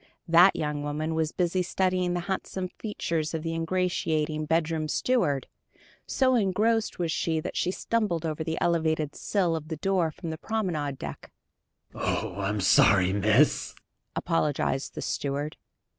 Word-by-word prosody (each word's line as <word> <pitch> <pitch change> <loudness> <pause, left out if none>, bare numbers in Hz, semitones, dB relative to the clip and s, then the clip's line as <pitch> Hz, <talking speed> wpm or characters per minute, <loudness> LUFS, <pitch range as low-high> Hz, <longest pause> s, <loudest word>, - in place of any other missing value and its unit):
That 175 +3 +7
young 150 -1 -2
woman 150 +2 -2
was 160 -1 0
busy 180 +1 0
studying 180 -1 0
the 175 - -1
handsome 190 0 -3
features 170 -7 -3
of 160 - -3
the 165 0 -2
ingratiating 160 -3 -1
bedroom 160 -1 +1
steward. 150 - +1 0.6
So 260 -1 +2
engrossed 220 +1 +1
was 170 -2 -1
she 160 0 0
that - - -5
she 180 - +1
stumbled 190 -4 -1
over 160 0 -2
the 160 0 -3
elevated 160 -3 +1
sill 180 -5 0
of 155 -1 -5
the 160 -1 -4
door 185 -1 +1
from 165 +2 -6
the 160 - -6
promenade 170 -12 -2
deck. - - -8 0.6
"Oh, 110 -3 -2
I'm 100 +1 -1
so 95 - +6
sorry, 95 -2 +4
miss!" 105 +8 +3 0.4
apologized 150 -5 0
the - - -4
steward. 145 +2 -2
160 Hz, 150 wpm, -27 LUFS, 150-180 Hz, 0.6 s, That